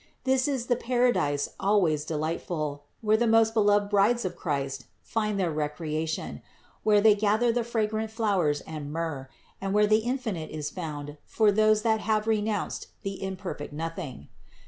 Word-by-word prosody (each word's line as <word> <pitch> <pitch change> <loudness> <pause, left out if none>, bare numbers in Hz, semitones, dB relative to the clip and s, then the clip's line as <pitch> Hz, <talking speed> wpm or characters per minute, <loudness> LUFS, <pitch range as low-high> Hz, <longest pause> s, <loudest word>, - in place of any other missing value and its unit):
This 260 0 +2
is 265 -4 -1
the 245 - +2
paradise 240 - +1
always 180 -7 +2
delightful, 155 -2 -3 0.2
where 215 -1 +3
the 235 +1 +2
most 225 0 +4
beloved 205 -2 +3
brides 210 +3 +3
of 185 - -3
Christ 140 -4 -3 0.2
find 210 -3 -1
their 180 -3 +1
recreation, 155 +1 -3 0.4
where 210 -1 +4
they 215 0 +7
gather 215 +3 +2
the 240 0 0
fragrant 220 -1 -1
flowers 195 -10 +1
and 150 -2 -7
myrrh, 155 -5 -4 0.3
and 195 +1 -1
where 210 0 +5
the 215 +1 +4
infinite 225 -9 -3
is 150 -1 -4
found 150 -4 -6
for 215 -2 +3
those 215 +1 +3
that 220 -1 +2
have 215 0 0
renounced 215 -2 -1 0.2
the 195 -1 -5
imperfect 190 -6 -5
nothing. 150 - -6
205 Hz, 155 wpm, -27 LUFS, 155-220 Hz, 0.4 s, they